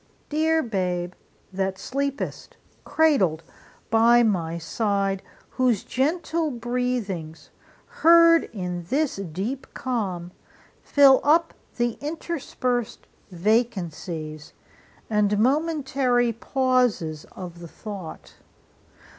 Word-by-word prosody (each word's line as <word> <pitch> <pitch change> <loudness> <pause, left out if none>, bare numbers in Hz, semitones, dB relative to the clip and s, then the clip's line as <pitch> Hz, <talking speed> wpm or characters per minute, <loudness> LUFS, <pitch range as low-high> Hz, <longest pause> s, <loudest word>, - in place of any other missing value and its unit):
Dear 320 +1 +2
Babe, 180 -5 -2 0.4
that 190 0 -1
sleepest 275 +7 -4 0.3
cradled 195 - +2 0.5
by 235 +2 +5
my 170 -7 0
side, 195 +2 -1 0.3
Whose 250 -6 +1
gentle 320 +3 -1
breathings, 235 - -3 0.3
heard 335 0 +5
in 180 -4 -5
this 280 - 0
deep 195 - -4
calm, 190 -9 -3 0.5
Fill 275 -2 +5
up 325 +3 +3 0.2
the 240 -2 -1
interspersed 285 -6 -3 0.2
vacancies 175 -6 -2 0.5
And 210 -1 +2
momentary 265 -2 +1
pauses 245 - 0
of 175 -2 -8
the 170 - -9
thought! 195 -2 -9
230 Hz, 85 wpm, -24 LUFS, 185-270 Hz, 0.5 s, by